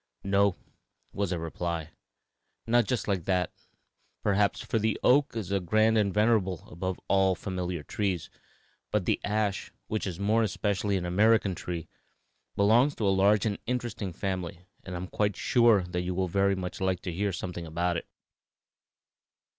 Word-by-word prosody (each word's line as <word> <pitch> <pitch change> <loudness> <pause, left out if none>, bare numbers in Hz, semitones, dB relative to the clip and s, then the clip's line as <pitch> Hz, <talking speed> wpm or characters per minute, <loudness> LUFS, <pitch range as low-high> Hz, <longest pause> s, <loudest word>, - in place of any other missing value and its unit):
"No," 100 -1 +3 0.6
was 100 -2 -1
the 90 - -1
reply; 85 0 -4 0.7
"not 120 0 +3
just 125 - -1
like 95 -5 -1
that, 90 -2 +1 0.7
perhaps, 100 0 +2
for 115 - -1
the 110 -1 0
oak 140 0 +4
is 100 -4 -3
grand 110 +2 +4
and 105 -3 +2
venerable 105 -5 +1
above 95 +1 -3
all 95 -1 +4
our 95 - +1
familiar 90 -4 -4
trees, 95 -3 -2 0.6
but 100 +4 0
the - - +1
ash, 105 -2 -1
which 110 -1 -2
is 90 -2 -5
more 105 +3 +2
especially 100 -1 0
an 90 - -3
American 105 +2 +3
tree, 85 -2 -5 0.7
belongs 120 +8 +4
to 105 - 0
a 95 - +4
large 100 +2 +4
and 105 -2 -1
interesting 120 -6 -2
family, 90 -1 -4 0.2
and 90 - -6
I - - -2
am 90 - -4
quite 105 +1 0
sure 115 -5 +4
that 90 0 -3
you 90 0 -3
will 95 0 0
very 100 +2 +2
much 90 -1 -5
like 95 -2 0
to 90 - -4
hear 100 +3 0
something 85 -1 -5
about 85 +2 -1
it. 80 - -4
95 Hz, 165 wpm, -28 LUFS, 90-105 Hz, 0.7 s, oak